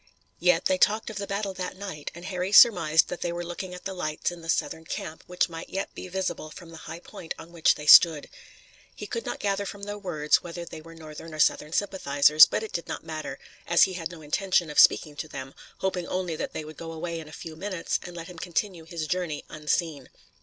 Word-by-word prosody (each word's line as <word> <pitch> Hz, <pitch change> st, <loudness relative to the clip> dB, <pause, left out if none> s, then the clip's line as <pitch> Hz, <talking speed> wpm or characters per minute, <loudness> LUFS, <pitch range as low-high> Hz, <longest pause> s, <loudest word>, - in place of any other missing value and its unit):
Yet 180 Hz, -1 st, +3 dB
they 185 Hz, -1 st, +2 dB
talked 215 Hz, +3 st, +2 dB
of 215 Hz, -, -8 dB
the 200 Hz, -1 st, -4 dB
battle 200 Hz, 0 st, -2 dB
that 185 Hz, 0 st, -5 dB
night, 185 Hz, -7 st, -6 dB
and 170 Hz, +1 st, -10 dB
Harry 185 Hz, 0 st, -3 dB
surmised 170 Hz, -8 st, +7 dB
that 180 Hz, -, -5 dB
they 175 Hz, -, -1 dB
were 175 Hz, 0 st, -4 dB
looking 180 Hz, +1 st, -6 dB
at 180 Hz, -, -12 dB
the 195 Hz, -, -3 dB
lights 155 Hz, -3 st, -2 dB
in 175 Hz, -1 st, -10 dB
the 165 Hz, -, -10 dB
Southern 160 Hz, -, -1 dB
camp 160 Hz, 0 st, -6 dB
which 180 Hz, 0 st, +1 dB
might 165 Hz, -1 st, -8 dB
yet 195 Hz, +1 st, -4 dB
be -, -, -8 dB
visible 180 Hz, -4 st, -3 dB
from 165 Hz, +1 st, -12 dB
the 165 Hz, -, -10 dB
high 165 Hz, +2 st, -6 dB
point 165 Hz, -, -8 dB
on 170 Hz, -, -12 dB
which 170 Hz, -2 st, +3 dB
they 150 Hz, -, -8 dB
stood. 155 Hz, 0 st, +8 dB, 0.7 s
He -, -, -7 dB
could 460 Hz, -, -4 dB
not -, -, -3 dB
gather 200 Hz, 0 st, 0 dB
from 200 Hz, 0 st, -8 dB
their 205 Hz, 0 st, -5 dB
words 155 Hz, -6 st, +1 dB
whether 175 Hz, 0 st, -7 dB
they 160 Hz, -2 st, -9 dB
were 165 Hz, +1 st, -13 dB
Northern 155 Hz, 0 st, -9 dB
or -, -, -9 dB
Southern 150 Hz, 0 st, +2 dB
sympathizers, 155 Hz, -6 st, +5 dB
but -, -, -2 dB
it 220 Hz, -, -7 dB
did 170 Hz, -, -3 dB
not -, -, -5 dB
matter, 155 Hz, -4 st, -5 dB, 0.3 s
as 170 Hz, -, +6 dB
he 190 Hz, -, +2 dB
had 170 Hz, -2 st, -4 dB
no 170 Hz, -3 st, -11 dB
intention 175 Hz, +1 st, +1 dB
of 150 Hz, -, +1 dB
speaking 150 Hz, -2 st, +5 dB
to 155 Hz, -, -4 dB
them, 135 Hz, -2 st, -8 dB, 0.3 s
hoping 185 Hz, -2 st, -1 dB
only 180 Hz, -3 st, -2 dB
that -, -, -4 dB
they 155 Hz, -, -5 dB
would 155 Hz, 0 st, -11 dB
go 165 Hz, -1 st, -7 dB
away 165 Hz, +1 st, -4 dB
in 160 Hz, -, -9 dB
a -, -, -12 dB
few 160 Hz, 0 st, -8 dB
minutes 185 Hz, 0 st, -2 dB
and 175 Hz, -, -9 dB
let 165 Hz, -, -6 dB
him 175 Hz, -1 st, -10 dB
continue 175 Hz, -1 st, -2 dB
his 165 Hz, -1 st, -4 dB
journey 170 Hz, -3 st, -2 dB
unseen. 150 Hz, -2 st, -2 dB
170 Hz, 240 wpm, -27 LUFS, 155-185 Hz, 0.7 s, stood